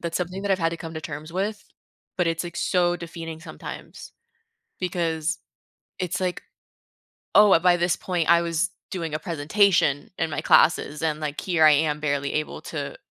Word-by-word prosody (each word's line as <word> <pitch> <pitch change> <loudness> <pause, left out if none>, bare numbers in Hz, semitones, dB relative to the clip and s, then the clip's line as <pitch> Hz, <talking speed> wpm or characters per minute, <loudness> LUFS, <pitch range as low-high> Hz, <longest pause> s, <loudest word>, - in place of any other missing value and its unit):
that's 170 -1 -3
something 180 +2 -3
that 200 - -2
I've 190 - +1
had 165 - +3
to 170 - -4
come 165 0 -8
to 155 - -4
terms 155 +1 -7
with, 200 +2 -2 0.5
but 180 -2 +1
it's, 165 +1 -1
like, 175 0 -7
so 175 -1 +2
defeating 165 -1 -7
sometimes 165 - -9 0.7
because 170 -1 -1 0.6
it's 180 -2 -2
like, 185 -1 -2 0.9
oh, 210 -1 +8
wha 165 - +6
by 180 0 +4
this 175 -1 +1
point, 175 -3 -2
I 170 0 +6
was 170 +3 0 0.2
doing 165 -5 -4
a 155 - -1
presentation 165 -2 +2
in 165 - 0
my 155 - -3
classes 150 -2 +3
and, 155 -2 0
like, 150 -1 -3
here 175 -4 +2
I 155 - +8
am 150 0 +2
barely 140 -2 -1
able 155 0 -2
to - - -5
165 Hz, 185 wpm, -24 LUFS, 155-180 Hz, 0.9 s, oh